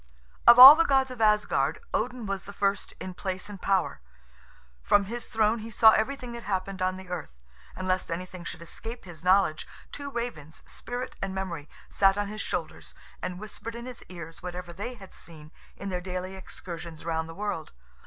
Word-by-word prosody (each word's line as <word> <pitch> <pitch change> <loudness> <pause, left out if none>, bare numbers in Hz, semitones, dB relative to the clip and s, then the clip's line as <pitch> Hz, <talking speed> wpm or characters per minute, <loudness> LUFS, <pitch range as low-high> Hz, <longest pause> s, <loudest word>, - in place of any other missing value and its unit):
Of 235 0 +10
all 260 +3 +14
the 330 - +4
gods 270 -3 +2
of 250 -2 -7
Asgard, 210 -1 +3 0.2
Odin 245 -3 -1
was 195 -1 -3
the 200 - -9
first 200 0 -1
in 185 - -6
place 185 0 -4
and 200 -2 -9
power; 190 - 0 0.8
from 205 - +4
his 235 +4 -6
throne 220 0 +2
he 220 +1 -7
saw 220 0 +7
everything 245 +3 -1
that 235 0 -7
happened 190 -2 -3
on 185 0 +1
the 190 0 -10
earth; 160 - -6 0.4
and 185 - -5
lest 185 0 0
anything 180 +1 -5
should 170 - -6
escape 225 +7 -8
his 170 -3 -11
knowledge, 180 -4 +3 0.2
two 285 0 -6
ravens, 235 - -6
Spirit 245 +1 -6
and 195 0 -3
Memory, 170 -6 -4 0.2
sat 195 0 +3
on 205 -1 -1
his 215 +1 -5
shoulders, - - -5 0.3
and 180 0 -4
whispered 220 +2 -7
in 235 +1 -7
his 250 -2 -8
ears 170 -2 -9
whatever 180 -1 -6
they 210 +7 -5
had 195 -5 -13
seen 155 -2 -11 0.3
in 200 - -5
their 180 -1 -2
daily 185 +1 -5
excursions 170 -3 -9
round 160 -1 -2
the 165 - -9
world. 200 -6 -4
195 Hz, 190 wpm, -28 LUFS, 180-225 Hz, 0.8 s, all